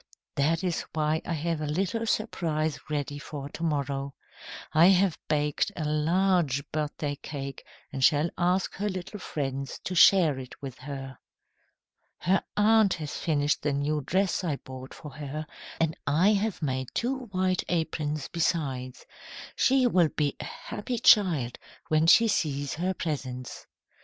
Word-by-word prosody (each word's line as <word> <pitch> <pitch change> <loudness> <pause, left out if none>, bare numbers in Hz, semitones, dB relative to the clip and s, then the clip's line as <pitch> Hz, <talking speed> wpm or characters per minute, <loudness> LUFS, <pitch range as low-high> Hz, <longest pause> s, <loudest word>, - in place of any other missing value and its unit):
"That 160 +5 +1
is 180 -3 0
why 155 0 +1
I - - -1
have 165 0 -2
a 150 - -2
little 195 +9 -1
surprise 160 -9 -1
ready 145 -1 -2
for 140 -1 -7
to 165 - -9
morrow. 140 -3 -2 0.6
I 160 +3 +7
have 190 -3 +4
baked 150 -1 +1
a 155 - -3
large 155 -1 +2
birthday 150 -1 -2
cake 140 -2 -6 0.3
and 135 -1 -2
shall 150 +3 +4
ask 180 +2 +1
her 205 +2 -1
little 185 +2 -6
friends 135 -5 -4
to 185 - -3
share 170 -6 +6
it 130 -1 -10
with 135 -2 -8
her. 135 -1 -7 1.0
"Her 190 +2 +1
aunt 215 -2 +5
has 155 -3 -6
finished 150 -2 0
the 145 -1 0
new 145 +2 0
dress 185 +6 0
I 160 -5 0
bought 130 -1 -10
for 150 - -10
her, 150 +1 -6 0.3
and 160 -1 +1
I 170 +9 +4
have 205 -3 -1
made 130 -2 -1
two 260 +2 -1
white 185 -3 0
aprons, 155 -3 -1
besides. 135 -7 -2 0.5
She 265 -1 +3
will 180 -9 +4
be 145 -2 -1
a - - -5
happy 240 +4 -5
child 165 - +4 0.3
when 155 +1 +3
she 230 +6 +7
sees 145 -8 0
her 185 +4 -1
presents." 130 -6 -5
155 Hz, 150 wpm, -28 LUFS, 145-185 Hz, 1.0 s, I